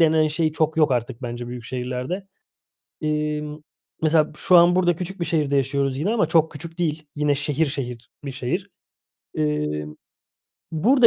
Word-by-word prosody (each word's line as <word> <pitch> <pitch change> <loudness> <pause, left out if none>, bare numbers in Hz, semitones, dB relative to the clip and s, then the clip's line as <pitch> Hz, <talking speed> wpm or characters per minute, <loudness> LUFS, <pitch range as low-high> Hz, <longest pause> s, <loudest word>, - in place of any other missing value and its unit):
denen 160 -1 +5
şey 155 +1 0
çok 160 0 0
yok 155 -3 +4
artık 120 0 -2
bence 120 0 -4
büyük 120 -1 -7
şehirlerde. 125 - -3 0.7
Emm, 150 0 -1 0.4
mesela 155 -1 +3
şu 180 - +5
an, 175 +1 +7
burada 175 -2 +3
küçük 185 +2 -5
bir 170 - +1
şehirde 150 -4 +1
yaşıyoruz 135 0 +1
yine 170 +8 0
ama 230 - +3
çok 160 -2 +3
küçük 165 +3 -8
değil. 160 -2 0
Yine 145 -1 +2
şehir 150 +2 +1
şehir 125 -4 -5
bir 140 - -4
şehir. 170 +10 -3 0.7
Iıı, 75 0 -1 0.8
burada 240 - +6
150 Hz, 155 wpm, -23 LUFS, 130-165 Hz, 0.8 s, an